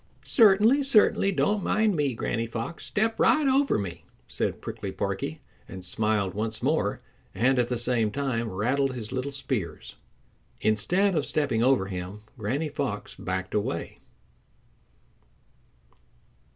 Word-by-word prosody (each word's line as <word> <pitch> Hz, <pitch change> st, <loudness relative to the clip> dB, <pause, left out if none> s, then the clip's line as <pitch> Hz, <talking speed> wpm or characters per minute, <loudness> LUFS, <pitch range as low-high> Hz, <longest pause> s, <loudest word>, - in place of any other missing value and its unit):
"Certainly, 220 Hz, +4 st, +5 dB
certainly. 215 Hz, -6 st, +4 dB
Don't 200 Hz, +1 st, +1 dB
mind 215 Hz, -2 st, +2 dB
me, 145 Hz, -5 st, 0 dB
Granny 115 Hz, 0 st, -2 dB
Fox. 115 Hz, +9 st, -5 dB
Step 220 Hz, +2 st, 0 dB
right 305 Hz, -1 st, +4 dB
over 275 Hz, +1 st, +3 dB
me," 95 Hz, -4 st, -5 dB, 0.2 s
said -, -, -1 dB
Prickly -, -, -6 dB
Porky, -, -, -3 dB, 0.3 s
and 95 Hz, -1 st, -7 dB
smiled 105 Hz, 0 st, 0 dB
once 110 Hz, +2 st, -3 dB
more, 130 Hz, -7 st, 0 dB, 0.3 s
and 125 Hz, +6 st, +3 dB
at 120 Hz, -, +2 dB
the 125 Hz, -, -2 dB
same 115 Hz, -2 st, +1 dB
time 120 Hz, -2 st, -2 dB
rattled 130 Hz, +7 st, 0 dB
his 110 Hz, -3 st, -6 dB
little 130 Hz, +2 st, -3 dB
spears. 130 Hz, -, -4 dB, 0.6 s
Instead 180 Hz, -, +2 dB
of 150 Hz, -4 st, 0 dB
stepping 140 Hz, -7 st, 0 dB
over 130 Hz, -5 st, +3 dB
him, 95 Hz, +2 st, -6 dB, 0.2 s
Granny 130 Hz, +9 st, -1 dB
Fox 125 Hz, -8 st, -4 dB
backed 95 Hz, 0 st, -4 dB
away. 100 Hz, -5 st, -2 dB
125 Hz, 130 wpm, -27 LUFS, 105-160 Hz, 0.6 s, Certainly